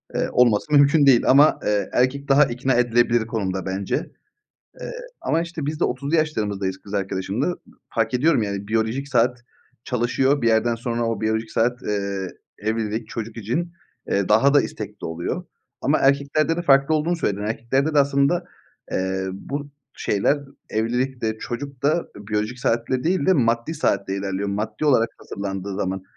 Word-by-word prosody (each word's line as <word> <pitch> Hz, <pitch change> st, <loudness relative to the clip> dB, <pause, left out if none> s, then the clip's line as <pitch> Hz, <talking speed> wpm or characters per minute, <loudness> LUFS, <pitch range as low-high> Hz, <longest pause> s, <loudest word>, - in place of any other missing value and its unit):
eee, -, -, 0 dB
olması 125 Hz, +4 st, +3 dB
mümkün 145 Hz, +1 st, +6 dB
değil. 130 Hz, -4 st, +6 dB
Ama, 145 Hz, +4 st, +6 dB
eee, 105 Hz, -2 st, 0 dB
erkek 140 Hz, +3 st, +1 dB
daha 140 Hz, +1 st, +6 dB
ikna 130 Hz, +1 st, -1 dB
edilebilir 120 Hz, -1 st, +2 dB
konumda 95 Hz, -5 st, -2 dB
bence. 95 Hz, +1 st, -2 dB, 0.9 s
Eee, -, -, -5 dB, 0.3 s
ama 165 Hz, +1 st, +1 dB
işte 170 Hz, -4 st, -5 dB
biz 150 Hz, +1 st, -3 dB
de -, -, +3 dB
otuzlu 140 Hz, +5 st, -2 dB
yaşlarımızdayız 105 Hz, -11 st, -1 dB
kız 100 Hz, +1 st, -10 dB
arkadaşımla. 95 Hz, +4 st, -1 dB
Iıı, 180 Hz, -, -1 dB, 0.4 s
fark 115 Hz, +1 st, 0 dB
ediyorum 135 Hz, -1 st, +3 dB
yani 100 Hz, 0 st, -4 dB
biyolojik 115 Hz, +5 st, -1 dB
saat 120 Hz, -1 st, +1 dB, 0.4 s
çalışıyor. 130 Hz, +2 st, +1 dB
Bir 115 Hz, -, +3 dB
yerden 115 Hz, +1 st, +2 dB
sonra 120 Hz, 0 st, -2 dB
o 115 Hz, -2 st, -2 dB
biyolojik 110 Hz, +1 st, -1 dB
saat, 120 Hz, +2 st, 0 dB
eee, 100 Hz, -2 st, -2 dB, 0.3 s
evlilik, 110 Hz, +1 st, -2 dB
çocuk 115 Hz, -1 st, -6 dB
için, 145 Hz, -, -2 dB, 0.4 s
eee, 100 Hz, -1 st, +1 dB
daha 135 Hz, +7 st, +4 dB
da 145 Hz, -, +7 dB
istekli 105 Hz, -1 st, -6 dB
oluyor. 80 Hz, +1 st, -4 dB, 0.4 s
Ama -, -, +2 dB
erkeklerde 140 Hz, +4 st, +2 dB
de 175 Hz, -, -2 dB
farklı 140 Hz, 0 st, +4 dB
olduğunu 165 Hz, +3 st, +1 dB
söyledim. 105 Hz, -10 st, -1 dB
Erkeklerde 130 Hz, +7 st, 0 dB
de -, -, +5 dB
aslında, 140 Hz, +5 st, +2 dB, 0.5 s
eee, 95 Hz, 0 st, -1 dB
bu 140 Hz, +8 st, -5 dB, 0.3 s
şeyler 105 Hz, +8 st, +1 dB, 0.3 s
evlilik 125 Hz, +4 st, -1 dB
de 110 Hz, 0 st, -1 dB
çocuk 135 Hz, +3 st, -6 dB
da, 145 Hz, +2 st, +3 dB, 0.2 s
eee, 105 Hz, -, -10 dB
biyolojik 110 Hz, +4 st, -1 dB
saatle 125 Hz, +2 st, 0 dB
değil 175 Hz, -4 st, +1 dB
de 190 Hz, -, +6 dB
maddi 115 Hz, +1 st, +1 dB
saatle 100 Hz, -10 st, 0 dB
ilerliyor 100 Hz, 0 st, -2 dB
maddi 110 Hz, +7 st, -3 dB
olarak 120 Hz, -6 st, +4 dB
hazırlandığı 100 Hz, -1 st, -5 dB
zaman. 95 Hz, 0 st, -2 dB
120 Hz, 165 wpm, -23 LUFS, 105-140 Hz, 0.9 s, da